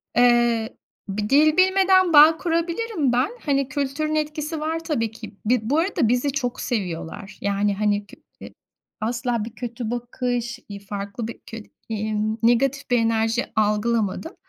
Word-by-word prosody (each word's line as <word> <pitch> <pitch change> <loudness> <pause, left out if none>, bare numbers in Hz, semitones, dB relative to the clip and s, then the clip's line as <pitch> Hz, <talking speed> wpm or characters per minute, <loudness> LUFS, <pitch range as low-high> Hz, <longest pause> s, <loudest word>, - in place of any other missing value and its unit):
Eee, 240 -2 +3 0.3
bir 210 +2 -3
dil 305 +3 +4
bilmeden 375 -1 +4
bağ 310 +2 +8
kurabilirim 335 - -1
ben. 250 +3 +2 0.2
Hani 275 -2 +1
kültürün 285 +3 -2
etkisi 305 +1 -2
var 320 +2 -2
tabii 235 -10 -1
ki. 220 -2 -11
Bi 245 +3 +3
bu 265 +8 0
arada 340 - +1
bizi 250 +5 +1
çok 255 -3 -3
seviyorlar. 195 -2 -4
Yani, 200 0 +1
hani, 205 0 0
kö - - -14 0.3
i - - -12 0.5
asla 235 0 -1
bir 230 0 -10
kötü 235 -2 -5
bakış, 245 0 -3
iii, 200 0 -7
farklı 200 +2 -6
bir 230 - -8
kö 225 - -8 0.3
iii, 215 0 -2 0.3
negatif 275 +4 +2
bir 245 - +5
enerji 225 +1 +1
algılamadım. 215 - 0
245 Hz, 150 wpm, -23 LUFS, 220-300 Hz, 0.5 s, bağ